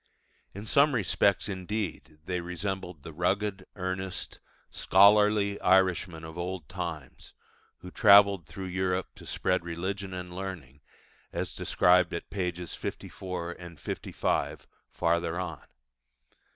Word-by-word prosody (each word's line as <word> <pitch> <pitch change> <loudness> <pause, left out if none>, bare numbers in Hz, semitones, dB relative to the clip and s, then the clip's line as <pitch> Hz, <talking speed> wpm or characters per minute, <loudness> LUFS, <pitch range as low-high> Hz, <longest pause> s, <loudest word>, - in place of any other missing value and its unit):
In 100 +2 -7
some 140 +4 +4
respects 100 -2 +2
indeed 95 -4 -4
they 90 0 -2
resembled 90 -2 -5
the 80 - -8
rugged, 95 +3 -1
earnest, 95 -1 -4 0.3
scholarly 100 +1 +5
Irishmen 90 -3 +3
of 80 +1 -8
old 90 -3 -4
times, 85 -6 -6 0.5
who 90 - -9
travelled 100 -4 +6
through 95 - -7
Europe 95 0 -1
to - - -11
spread 90 -1 0
religion 95 +4 -4
and 90 -1 -6
learning, 85 -8 -7 0.5
as - - -3
described 90 -1 +3
at - - -7
pp. 90 -3 -3
54, 85 -2 -6
55, - - -2 0.2
farther 85 +1 0
on. 85 -5 -4
90 Hz, 110 wpm, -29 LUFS, 85-100 Hz, 0.5 s, travelled